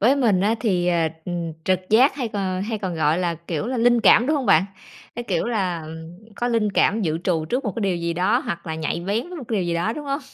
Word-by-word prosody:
với 250 Hz, +7 st, +4 dB
mình 225 Hz, -9 st, +2 dB
á 210 Hz, +4 st, +2 dB
thì, 180 Hz, -5 st, +1 dB
ờ, 170 Hz, -2 st, +2 dB, 0.2 s
ừm, 170 Hz, -2 st, -3 dB
trực 185 Hz, -1 st, +2 dB
giác 250 Hz, +7 st, +5 dB
hay 260 Hz, -4 st, -3 dB
còn 190 Hz, -3 st, -2 dB
hay 220 Hz, +1 st, -3 dB
còn, 190 Hz, -4 st, -3 dB
gọi 160 Hz, 0 st, +1 dB
là, 175 Hz, -2 st, 0 dB
kiểu 165 Hz, +4 st, -2 dB
là, 255 Hz, +1 st, -2 dB
linh 240 Hz, 0 st, +4 dB
cảm, 235 Hz, +2 st, +6 dB
đúng 305 Hz, +2 st, +2 dB
hông 270 Hz, -4 st, -2 dB
bạn? 160 Hz, +4 st, +5 dB, 0.5 s
Cái, 240 Hz, -, -4 dB
kiểu 185 Hz, -5 st, -1 dB
là, 190 Hz, -8 st, -1 dB
ừm, 160 Hz, +2 st, -10 dB, 0.2 s
có 240 Hz, -, -1 dB
linh 220 Hz, -4 st, +1 dB
cảm 215 Hz, +4 st, +2 dB
dự 160 Hz, -3 st, -1 dB
trù 165 Hz, -4 st, 0 dB
trước 250 Hz, -, -2 dB
một 210 Hz, -, -2 dB
cái -, -, -2 dB
điều 195 Hz, -4 st, 0 dB
gì 170 Hz, 0 st, -2 dB
đó, 185 Hz, +8 st, +2 dB
hoặc 170 Hz, -9 st, -5 dB
là 160 Hz, -, -3 dB
nhạy 160 Hz, +1 st, -2 dB
bén 205 Hz, -, -2 dB
với 360 Hz, -, -8 dB
một 270 Hz, -, -7 dB
cái 225 Hz, -, 0 dB
điều 185 Hz, -, -1 dB
gì 170 Hz, -, -1 dB
đó, 175 Hz, +6 st, 0 dB
đúng 295 Hz, +4 st, -7 dB
hông? 280 Hz, +1 st, -2 dB
195 Hz, 280 wpm, -22 LUFS, 170-235 Hz, 0.5 s, cảm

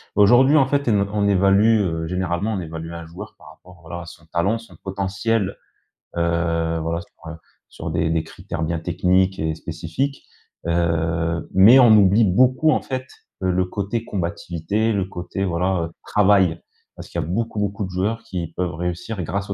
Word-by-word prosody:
Aujourd'hui, 120 Hz, +8 st, +6 dB
en 140 Hz, -, +5 dB
fait, 140 Hz, -1 st, 0 dB
en 110 Hz, -, +3 dB, 0.2 s
on 105 Hz, -1 st, +1 dB
évalue, 100 Hz, +3 st, +4 dB
heu, 80 Hz, -3 st, -2 dB
généralement, 90 Hz, +4 st, -1 dB
on 100 Hz, -, -2 dB
évalue 80 Hz, -1 st, -6 dB
un 85 Hz, -1 st, -7 dB
joueur 95 Hz, +6 st, -10 dB
par -, -, -15 dB
rapport, 90 Hz, -1 st, -18 dB
voilà, 85 Hz, +2 st, -7 dB
à 85 Hz, -, -9 dB
son 85 Hz, -1 st, -13 dB
talent, 90 Hz, +7 st, 0 dB
son 115 Hz, 0 st, -14 dB
potentiel, 100 Hz, +2 st, -2 dB, 0.6 s
heu, 85 Hz, -1 st, 0 dB
voilà 85 Hz, +1 st, -2 dB
sur, 80 Hz, -1 st, -12 dB
heu, -, -, -8 dB, 0.3 s
sur -, -, -7 dB
des -, -, 0 dB
des 80 Hz, -1 st, 0 dB
critères 80 Hz, -, -6 dB
bien 80 Hz, +1 st, -1 dB
techniques 90 Hz, +3 st, +1 dB
et 80 Hz, 0 st, -1 dB
spécifiques. 85 Hz, -, -4 dB, 0.4 s
Heu, 85 Hz, 0 st, 0 dB
mais 105 Hz, +8 st, +8 dB
on 120 Hz, -4 st, +7 dB
oublie 105 Hz, +2 st, +5 dB
beaucoup 130 Hz, -, +3 dB
en -, -, +1 dB
fait, 130 Hz, -1 st, -4 dB, 0.4 s
heu, 95 Hz, -, +2 dB
le 90 Hz, +1 st, +1 dB
côté 100 Hz, +5 st, -3 dB
combativité, 85 Hz, +4 st, -2 dB
le 95 Hz, -2 st, 0 dB
côté, 90 Hz, +1 st, -5 dB
voilà, 90 Hz, 0 st, 0 dB
heu, -, -, -7 dB, 0.2 s
travail. 95 Hz, -5 st, +3 dB, 0.3 s
Parce -, -, -10 dB
qu'il 85 Hz, -, -4 dB
y -, -, -3 dB
a -, -, -6 dB
beaucoup, 110 Hz, +4 st, -2 dB
beaucoup 100 Hz, 0 st, -2 dB
de -, -, -7 dB
joueurs 105 Hz, +5 st, -2 dB
qui 90 Hz, -7 st, -5 dB
peuvent 90 Hz, -1 st, -2 dB
réussir 90 Hz, +4 st, -4 dB
grâce 100 Hz, +5 st, -3 dB
au -, -, -1 dB
95 Hz, 185 wpm, -22 LUFS, 85-105 Hz, 0.6 s, mais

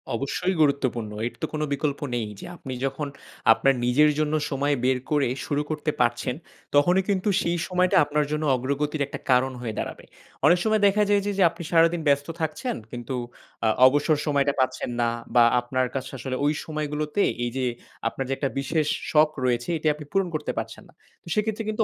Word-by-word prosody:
অবশ্যই 140 Hz, +9 st, -1 dB
গুরুত্বপূর্ণ। 130 Hz, -7 st, +1 dB, 0.2 s
এর -, -, -7 dB
তো -, -, +1 dB
কোন 155 Hz, -, -2 dB
বিকল্প 140 Hz, 0 st, -1 dB, 0.2 s
নেই 115 Hz, -3 st, -1 dB
যে -, -, -8 dB
আপনি 135 Hz, -6 st, -7 dB
যখন, 135 Hz, +2 st, -3 dB, 0.5 s
আপনার 135 Hz, +4 st, +3 dB
নিজের 150 Hz, +5 st, +4 dB
জন্য 155 Hz, 0 st, 0 dB, 0.2 s
সময় 145 Hz, +1 st, +1 dB
বের 130 Hz, 0 st, +3 dB
করে 145 Hz, -2 st, +3 dB, 0.2 s
শুরু 145 Hz, 0 st, 0 dB
করতে 155 Hz, 0 st, -1 dB
পারছেন 120 Hz, +1 st, 0 dB, 0.4 s
তখনই 180 Hz, +6 st, +4 dB
কিন্তু 195 Hz, +1 st, +1 dB
সেই 170 Hz, +1 st, 0 dB
সময়টা 180 Hz, 0 st, +2 dB
আপনার 150 Hz, 0 st, 0 dB
জন্য 150 Hz, +1 st, -1 dB
অগ্রগতির 140 Hz, +3 st, -1 dB
একটা -, -, -7 dB
কারণ 130 Hz, +1 st, +3 dB
হয়ে 115 Hz, -3 st, -4 dB
দাঁড়াবে। -, -, -5 dB, 0.4 s
অনেক 175 Hz, +4 st, +6 dB
সময় 215 Hz, -1 st, +2 dB
দেখা 210 Hz, +2 st, +3 dB
যায় 205 Hz, -1 st, +4 dB
যে, 205 Hz, -, 0 dB
যে 195 Hz, -, +4 dB
আপনি 170 Hz, -, -9 dB
সারাদিন 165 Hz, 0 st, +4 dB
ব্যস্ত 140 Hz, 0 st, +3 dB
থাকছেন 160 Hz, -, -2 dB, 0.2 s
কিন্তু 120 Hz, +1 st, -5 dB, 0.5 s
আ -, -, +4 dB, 0.2 s
অবসর 145 Hz, +3 st, +2 dB
সময়টা 140 Hz, -2 st, +2 dB
পাচ্ছেন 130 Hz, -1 st, 0 dB
না 115 Hz, -, +2 dB, 0.3 s
বা 120 Hz, -, +8 dB, 0.2 s
আপনার 130 Hz, +1 st, -1 dB
কাছে 130 Hz, 0 st, -4 dB
আসলে 130 Hz, +1 st, -4 dB
ওই 150 Hz, -, +3 dB
সময়গুলোতে 150 Hz, +4 st, -1 dB, 0.2 s
এই 120 Hz, -, 0 dB
যে 130 Hz, -, 0 dB, 0.4 s
আপনার 135 Hz, +3 st, -3 dB
যে -, -, +1 dB
একটা 140 Hz, -, -1 dB
বিশেষ 150 Hz, +2 st, 0 dB, 0.2 s
শখ 155 Hz, 0 st, +5 dB, 0.2 s
রয়েছে 120 Hz, +1 st, 0 dB
এটি 155 Hz, 0 st, -2 dB
আপনি 150 Hz, 0 st, -10 dB
পূরণ 195 Hz, -1 st, +1 dB
করতে -, -, -2 dB
পারছেন -, -, -5 dB
না। -, -, -20 dB, 0.3 s
তো -, -, -21 dB
সেক্ষেত্রে 220 Hz, +1 st, -1 dB
কিন্তু 215 Hz, +1 st, +1 dB
145 Hz, 190 wpm, -25 LUFS, 130-160 Hz, 0.5 s, বা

